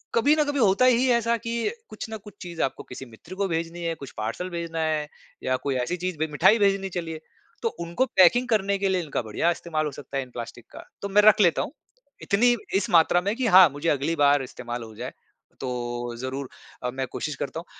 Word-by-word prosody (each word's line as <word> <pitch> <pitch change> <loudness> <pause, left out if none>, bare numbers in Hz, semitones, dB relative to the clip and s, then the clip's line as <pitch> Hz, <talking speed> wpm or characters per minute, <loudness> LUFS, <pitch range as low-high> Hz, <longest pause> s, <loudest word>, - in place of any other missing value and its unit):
कभी 285 +6 +4
ना 305 - +3
कभी 290 -1 -2
होता 210 +3 +4
ही 255 +1 +4
ऐसा 235 0 +2
कि 230 - -2 0.2
कुछ 215 +1 -7
ना 220 - -5
कुछ 210 0 -14
चीज़ 175 -2 -5
आपको 135 - -2
किसी 130 +1 -9
मित्र 160 +11 -12
को 200 0 0
भेजनी 165 0 -3
है, 165 -1 -1
कुछ 140 -4 -10
पार्सल 115 +13 -3
भेजना 170 -1 -4
है, 155 -2 0 0.4
या 130 0 +1
कोई 140 -2 -1
ऐसी 180 +9 -2
चीज़ 180 -2 -3
भे 160 - +1
मिठाई 190 +9 +5
भेजनी 195 -1 +2
चलिए 165 -2 -4 0.4
तो 460 - +1
उनको 170 +10 0
पैकिंग 235 +4 +4
करने 200 -2 +2
के 195 0 0
लिए 185 -1 +1
इनका 145 - -2
बढिया 115 +10 0
इस्तेमाल 160 -2 -2
हो 150 - -2
सकता 140 0 -7
है 135 - 0
इन 125 - -14
प्लास्टिक 120 0 -8
का - - -11 0.2
तो 200 - -3
मैं 205 +2 +5
रख 215 0 +6
लेता 170 -4 +4
हूँ। - - -4 0.5
इतनी 240 +4 +3 0.2
इस 195 - +1
मात्रा 175 +1 +5
में 200 +4 -1
कि 255 -1 0
हाँ, 185 -5 +8
मुझे 145 +4 -2
अगली 150 +3 0
बार 145 -2 +4
इस्तेमाल 120 -1 -6
हो 110 -1 -11
जाए - - -6 0.5
तो 120 -1 -4
ज़रूर 130 +2 -5 0.3
अ, 125 - 0
मैं 130 0 -3
कोशिश 150 -2 -4
करता 160 - -4
हूँ 170 - -10
170 Hz, 230 wpm, -25 LUFS, 140-200 Hz, 0.5 s, हाँ